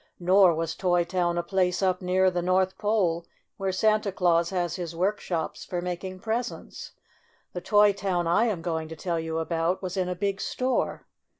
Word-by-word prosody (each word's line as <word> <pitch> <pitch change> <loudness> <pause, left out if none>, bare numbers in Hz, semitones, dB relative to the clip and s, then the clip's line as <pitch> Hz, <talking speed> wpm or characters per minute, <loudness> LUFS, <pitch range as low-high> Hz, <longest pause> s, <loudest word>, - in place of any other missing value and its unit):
Nor 185 -1 +5
was 165 0 -2
Toy 175 -2 +1
Town 175 -1 -1
a 175 - 0
place 180 0 0
up 185 -1 +1
near 185 +1 +2
the 175 -1 -1
North 185 +1 +1
Pole, 185 -6 0 0.3
where 195 -1 -1
Santa 215 +1 +2
Claus 170 -2 +2
has 175 -2 -1
his 170 -3 -5
workshops 180 -2 -2
for 175 - -4
making 180 +1 -5
presents. 230 +3 -4 0.6
The 180 - -4
Tcy 205 0 +4
Town 185 -3 -1
I 175 +7 +3
am 200 -8 -2
going 160 -2 -2
to 160 - -8
tell 170 +1 -2
you 160 0 -3
about 165 +3 -1
was 185 +1 -4
in 185 -1 0
a 180 - -2
big 195 +1 -2
store. 255 0 -1
180 Hz, 185 wpm, -26 LUFS, 170-195 Hz, 0.6 s, Nor